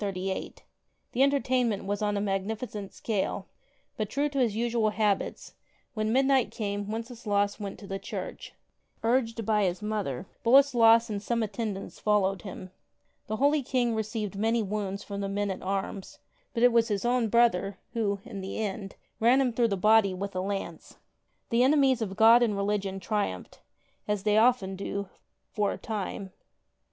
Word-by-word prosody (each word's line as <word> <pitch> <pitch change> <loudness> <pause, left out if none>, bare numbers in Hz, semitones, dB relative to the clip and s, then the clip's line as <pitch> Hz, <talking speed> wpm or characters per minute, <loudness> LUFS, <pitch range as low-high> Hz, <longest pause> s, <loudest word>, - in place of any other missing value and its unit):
The 190 -1 -2 0.8
entertainment 255 -6 +2
was 205 +1 -2
on 205 -1 0
a - - -1
magnificent 205 +1 -3
scale, 210 -4 -2 0.5
but, 215 -2 -2
true 285 +5 0
to 280 -1 -2
his 230 -5 +2
usual 230 -1 +1
habits, 210 -2 -1 0.4
when 215 -2 -1
midnight 265 0 +3
came 205 -1 -4
Wenceslaus 220 -3 -1
went 200 -2 -5
to 205 - -11
the 195 0 -4
church. - - -7 0.5
Urged 230 -1 +1
by 210 -1 +2
his 180 +2 -2
mother, 205 -8 -2 0.2
Boleslas 235 -3 +6
and 200 -1 -3
some 235 +1 0
at 210 -2 -4
tendants 205 -3 -4
followed 195 -3 +1
him. 185 -1 -8 0.6
The 215 - -2
holy 285 +5 +3
King 245 -2 0
received 215 -2 -3
many 225 +3 +1
wounds 200 -1 -3
from 200 -1 -5
the 195 - -2
men 200 0 -1
at 190 - -6
arms, 195 0 -4 0.4
but 235 - +1
it 245 - +7
was 230 -1 +3
his 205 0 -2
own 245 -1 +2
brother 205 -4 +2 0.2
who, 205 -4 -1
in 200 -4 -7
the 190 - -5
end, 200 -2 -4 0.2
ran 240 +4 +5
him 255 -3 +1
through 235 +1 +2
the 200 -3 -1
body 210 -1 +4
with 200 +1 -5
a 185 - 0
lance. 195 +1 -5 0.5
The 230 +1 +3
enemies 265 -2 +4
of 195 -3 -3
God 225 +3 +7
and 215 -4 +1
religion 200 -1 -1
triumphed, 190 - -3 0.5
as 210 -2 -1
they 210 0 +4
often 225 -5 +3
do' 200 0 -4 0.4
for 205 -2 0
a - - -7
time. 200 -3 -5
210 Hz, 165 wpm, -28 LUFS, 200-235 Hz, 0.8 s, it